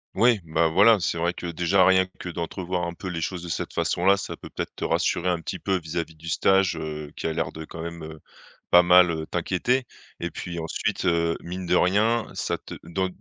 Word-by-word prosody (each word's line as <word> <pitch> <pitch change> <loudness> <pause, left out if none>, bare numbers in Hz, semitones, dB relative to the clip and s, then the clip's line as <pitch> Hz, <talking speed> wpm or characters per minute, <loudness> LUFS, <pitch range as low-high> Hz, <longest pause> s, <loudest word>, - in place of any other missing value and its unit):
Oui, 115 0 +4
ben 80 0 +1
voilà 100 +7 +5
c'est 85 0 -1
vrai 85 +1 +1
que 90 - -8
déjà 90 +3 +3
rien 95 0 +5
que - - -7
d'entrevoir 90 +1 -3
un 85 - -4
peu 95 - -8
les 85 -3 -3
choses 90 +1 -3
de - - -7
cette 80 - -3
façon 85 - -1
là 100 +1 +5
ça 100 - -5
peut - - -11
peut-être - - -5
te - - -6
rassurer 90 +1 +1
un 90 -1 0
petit 85 - -5
peu 95 +1 0
vis-à-vis 80 0 -4
du 80 +2 -12
stage, 95 +3 +3
heu, 75 -2 -6
qui - - -3
a 80 - -1
l'air - - -2
de 80 - -7
quand 80 +1 -9
même, 85 0 -6
heu, 80 0 -9 0.5
pas 90 0 +8
mal, 90 0 +7
heu, 80 -1 -3
t'inquiéter. 95 +9 0 0.3
Et 85 - -3
puis 85 0 -6
ensuite, 90 +5 -2
heu, 85 -1 +2
mine 90 +2 -6
de 90 - +2
rien 110 +5 +2
ça - - -2
te - - -11
dans 95 +3 -1
85 Hz, 230 wpm, -25 LUFS, 80-95 Hz, 0.5 s, pas